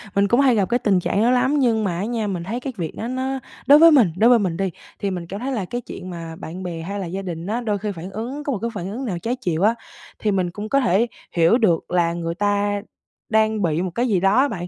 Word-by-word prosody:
Mình 200 0 +3
cũng 240 +6 +3
hay 260 -4 +5
gặp 200 -1 +1
cái 245 +1 +2
tình 195 -5 +2
trạng 195 +3 0
đó 240 +2 +4
lắm, 260 +4 +2
nhưng 225 -4 +2
mà 175 -4 -1
á 195 - -2
nha, 225 -2 -2
mình 180 -3 -3
thấy 230 +7 -3
cái 260 0 -5
việc 165 -3 -4
đó 230 - -4
nó 260 +1 -2 0.3
đối 290 +2 +8
với 330 0 +8
mình 235 - +5
đối 230 +4 +5
với 240 -2 +6
mình 180 -5 -1
đi, 195 -1 0 0.3
thì 200 -1 -1
mình 175 -2 -5
cảm 200 +3 -6
thấy 265 +3 -3
là 210 -7 -2
cái 245 +6 -4
chuyện 185 -4 -9
mà 165 -2 -7
bạn 175 +3 -8
bè 170 -2 -5
hay 200 +4 -5
là 190 - -3
gia 190 +3 -4
đình 170 -2 -5
á, 235 +4 -1
đôi 210 -3 -1
khi 205 +1 -3
phản 180 +1 -8
ứng 250 +8 -5
có 285 - -2
một 205 - -3
cái 235 - -1
phản 190 -1 -5
ứng 255 +4 -4
nào 180 -6 -3
trái 240 +5 -2
chiều 175 -7 -2
á, 225 +2 +4 0.4
thì 210 - 0
mình 185 -3 0
cũng 210 +3 -6
có 275 - +3
thể 235 -1 +2 0.2
hiểu 170 +7 +4
được 180 -10 +1
là 170 -1 +2
người 170 0 -3
ta 205 0 0 0.5
đang 220 -1 +2
bị 165 -1 +1
một 185 -2 -2
cái 245 +2 +1
gì 195 -5 +2
đó 195 +2 +3
á 275 +2 +5
bạn. 180 -7 -5
205 Hz, 295 wpm, -22 LUFS, 180-240 Hz, 0.5 s, đối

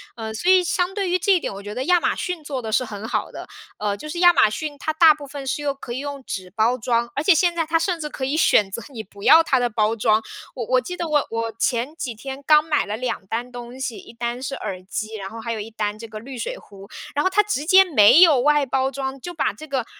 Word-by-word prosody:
嗯， 220 -1 -6
所 360 +10 +2
以 370 -1 +5
相 360 +1 -1
对 390 -2 -2
于 360 - +2
这 365 +3 +1
一 360 - +3
点， - - -5
我 200 +1 -9
觉 205 +1 -7
得 255 +3 -3
亚 355 0 +4
马 - - +1
逊 360 -4 -4
做 275 -3 -4
的 220 -1 -5
是 255 - +2
很 215 -1 -7
好 - - -2
的。 - - -9 0.3
呃， 205 -1 -1
就 305 +9 -9
是 345 +2 -4
亚 350 -1 +7
马 215 - +4
逊 295 +6 -5
它 315 - -2
大 315 0 +6
部 295 -1 -10
分 275 0 -8
是 295 - -2
用 285 -1 -1
可 240 - -7
以 255 - -4
用 285 -1 -6
纸 185 -2 -6
包 225 +6 +1
装， 235 0 0
而 285 - -1
且 380 - +6
现 345 +2 +2
在 330 -1 0
它 325 +1 +1
甚 345 0 -1
至 300 - -4
可 265 - -4
以 275 +3 -1
选 210 -10 +3
择 235 - -6
你 240 -5 -7
不 200 +1 -15
要 310 +7 +8
它 265 -5 +2
的 245 -1 0
包 215 +1 0
装， 215 0 +2 0.3
我 240 - -4
我 255 +2 +2
记 360 +8 -7
得 340 - -3
我 295 -2 +1
我 230 0 -3
前 250 +6 -1
几 260 -7 -4
天 270 +5 -8
刚 305 0 +5
买 300 -2 +1
了 210 +1 -4
2 250 -5 -4
单 235 +4 -3
东 245 +1 -9
西， 250 -4 -4
1 - - -12
单 235 +1 -4
是 275 +1 -4
耳 185 -1 -6
机， 215 +3 -5
然 195 -2 -6
后 225 +3 -9
还 230 +1 -4
有 220 - -5
1 220 +2 -7
单- 210 -1 -3
这 230 - -9
个 215 -1 -8
滤 255 +2 -9
水 - - -4
壶。 200 -1 -14 0.3
然 290 - +1
后 - - +2
它 400 +3 +4
直 355 -9 -2
接 380 +3 +7
没 290 - +6
有 305 -8 +6
外 295 +1 +3
包 265 0 0
装， 270 0 -5
就 350 +6 -7
把 320 - -1
这 310 - -11
个 265 -5 -2
265 Hz, 300 characters per minute, -22 LUFS, 225-310 Hz, 0.3 s, 要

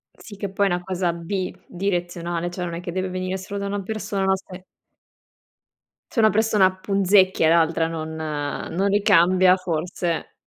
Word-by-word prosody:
Sì, 205 -3 -12
che 200 - -3
poi 200 +1 +2
è - - 0
una 175 0 -1
cosa 180 -2 -1
bidirezionale, 175 -1 -3
cioè 180 0 -4
non 170 -1 -4
è 170 - -6
che 175 - -5
deve 185 +1 -2
venire 185 +1 -3
solo 200 +2 -6
da 200 - -3
una 200 0 -2
persona, 205 -1 -3
no, 190 0 +3
se 185 -1 -11 1.5
Se 230 - -1
una 220 -1 +6
persona 205 -3 +3
punzecchia, 190 -3 +3
l'altra 165 0 +3
non 160 -1 -5
non 155 +4 -2
ricambia 185 -2 +5
forse 175 -1 -3
185 Hz, 160 wpm, -23 LUFS, 170-195 Hz, 1.5 s, una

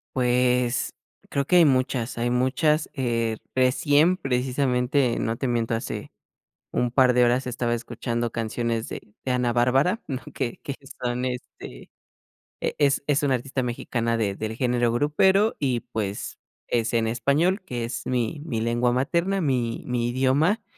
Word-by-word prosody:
Pues, 125 0 +1 0.4
creo 140 0 0
que 180 - +2
hay 175 - +8
muchas, 130 -4 +1
hay 120 +1 0
muchas, 135 +5 +1
eh, 115 -3 0 0.2
recién 145 +7 +3
precisamente, 125 -1 +1
no 115 +1 -1
te 135 - -2
miento 120 -1 0
hace 115 - -4 0.6
un 125 - 0
par 125 0 +4
de 125 0 +4
horas 120 +2 +2
estaba 120 -1 -1
escuchando 120 0 -3
canciones 115 0 -2
de 105 - -9
de 130 - -1
Ana 125 -1 +1
Bárbara, 135 - +2
¿no?, 135 -3 -4
que 120 - -3
que 140 - -4 0.3
son, 125 +1 -2
este, 125 - -7 0.7
e - - -1
es 140 -2 +3
es 145 -1 +2
una 135 -3 +2
artista 130 +2 -3
mexicana 120 -1 -1
de 105 -3 0
del 110 +2 -4
género 120 -1 +1
grupero. 190 - +3
Y 130 -5 0
pues, 100 -2 -4 0.3
es 120 0 0
en 115 -1 +2
español, 140 - +1
que 120 -10 -4
es 120 +1 -5
mi 125 +3 -1
mi 125 -9 -3
lengua 120 +2 +1
materna, 170 +9 0
mi 125 -6 -1
mi 120 -1 -1
idioma 140 - +2
125 Hz, 155 wpm, -25 LUFS, 120-140 Hz, 0.7 s, hay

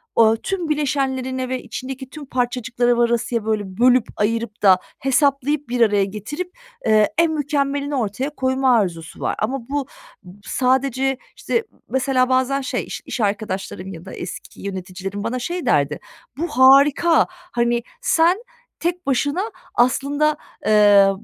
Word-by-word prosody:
o 225 -1 +5
tüm 350 +7 -3
bileşenlerine 265 -3 -1
ve 255 -1 -2
içindeki 260 +2 -7
tüm 300 +1 -9
parçacıklara 245 -1 0
varasıya, 235 -1 +1
böyle, 215 -1 0
bölüp, 250 -1 +4
ayırıp 225 +1 -1
da 190 -3 +6 0.2
hesaplayıp, 280 +1 +1
bir 245 0 -1
araya 205 -3 +4
getirip, 255 - -6 0.3
eee, 215 -1 +4
en 335 -1 +4
mükemmelini 285 -1 -1
ortaya 250 +3 -2
koyma 260 -2 +2
arzusu 170 -6 -3
var. - - -1
Ama 240 +2 -3
bu 285 -1 -2 0.4
b 180 +2 -14
sadece, 265 +1 +1 0.2
işte, - - -4 0.2
m - - -29
mesela, 260 -1 +1
bazen 260 +2 +2
şey, 270 - -2
iş - - -6
iş 250 - -4
arkadaşlarım 195 -2 -3
ya 165 +1 -10
da - - -9
eski 175 - -8
yöneticilerim 190 +1 -5
bana 235 +3 -2
şey 345 +5 -4
derdi: 145 - +2 0.4
"Bu 335 +4 -1
harika. 280 +5 +5
Hani, 240 -10 -2 0.2
sen 350 -3 +3 0.4
tek 350 +1 -2
başına 285 +6 +1 0.3
aslında, 285 +5 +2 0.3
eee, 205 -2 +6
255 Hz, 140 wpm, -21 LUFS, 220-280 Hz, 0.4 s, da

